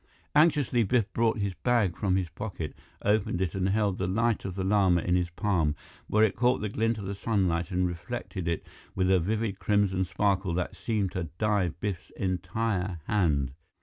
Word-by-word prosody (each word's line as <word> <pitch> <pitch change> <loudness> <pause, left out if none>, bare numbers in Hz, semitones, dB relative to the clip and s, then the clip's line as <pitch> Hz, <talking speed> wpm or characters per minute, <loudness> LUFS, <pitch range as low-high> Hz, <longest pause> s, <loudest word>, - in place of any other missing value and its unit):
Anxiously, 145 -5 +4
Biff 115 -1 +1
brought 115 -1 +2
the 100 -2 -1
bag 115 -8 +2
from 95 -3 +1
his 95 -3 0
pocket, 85 -3 -5 0.3
opened 105 -2 +2
it 95 -4 -1
and 95 0 0
held 100 -2 +1
the 95 - 0
Light 115 +3 +1
of 95 -2 -4
the 95 - -2
Lama 95 -3 +3
in 90 +1 +1
his 90 -1 +1
palm, 85 -4 0 0.3
where 105 +1 +3
it 110 - +3
caught 125 +3 +2
the 105 - -2
glint 115 +2 0
of 100 - -6
the 100 - -3
sunlight 95 -5 0
and 90 -1 +1
reflected 90 +1 -5
it 85 -1 -1 0.3
with 95 0 +2
a 95 - +5
vivid 105 +2 -1
crimson 100 -3 +2
sparkle 95 -1 0
that 90 0 -2
seemed 105 -5 -1
to 90 -3 -3
dye 105 -3 +2
Biff's 90 +2 -4
entire 95 0 -1
hand. 75 -10 +1
95 Hz, 185 wpm, -28 LUFS, 90-110 Hz, 0.3 s, a